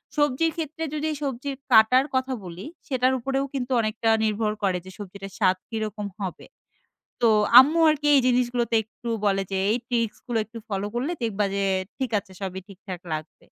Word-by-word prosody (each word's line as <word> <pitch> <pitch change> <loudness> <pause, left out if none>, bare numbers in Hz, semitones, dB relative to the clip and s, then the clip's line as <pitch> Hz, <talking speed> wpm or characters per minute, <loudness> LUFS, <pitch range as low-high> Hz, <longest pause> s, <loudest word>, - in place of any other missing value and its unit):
সবজির 295 +2 +2
ক্ষেত্রে 320 0 -4
যদি 305 +1 -1
সবজির 275 0 -3 0.2
কাটার 245 +4 +6
কথা 260 0 0
বলি, 180 +4 -8 0.2
সেটার 260 -2 +2
উপরেও 270 +2 -1
কিন্তু 260 -1 -3
অনেকটা 220 +1 -1
নির্ভর 215 0 0
করে 185 -2 +2
যে 190 - -10
সবজিটা 195 -1 -8
স্বাদ 185 -2 +3
কিরকম 215 -2 -3 0.2
হবে। 185 - -6 0.8
তো 235 - +6 0.3
আম্মু 300 +6 +3
আরকি 295 -1 -1
এই 275 - +6
জিনিসগুলোতে 245 -2 +1
একটু 235 +2 -10 0.2
বলে 195 -1 +2
যে, 195 - -1
"এই 235 - +2
ট্রিকস 230 -3 -1
গুলো 240 -2 0
একটু 230 +2 -10
ফলো 200 0 -2
করলে 265 +8 -1
দেখবা 210 -3 0
যে 200 0 0 0.3
ঠিক 260 -3 -2
আছে 190 - -11
সবই 190 -1 -4
ঠিকঠাক 190 -2 -9
লাগবে।" 155 0 -6
230 Hz, 175 wpm, -25 LUFS, 200-265 Hz, 0.8 s, কাটার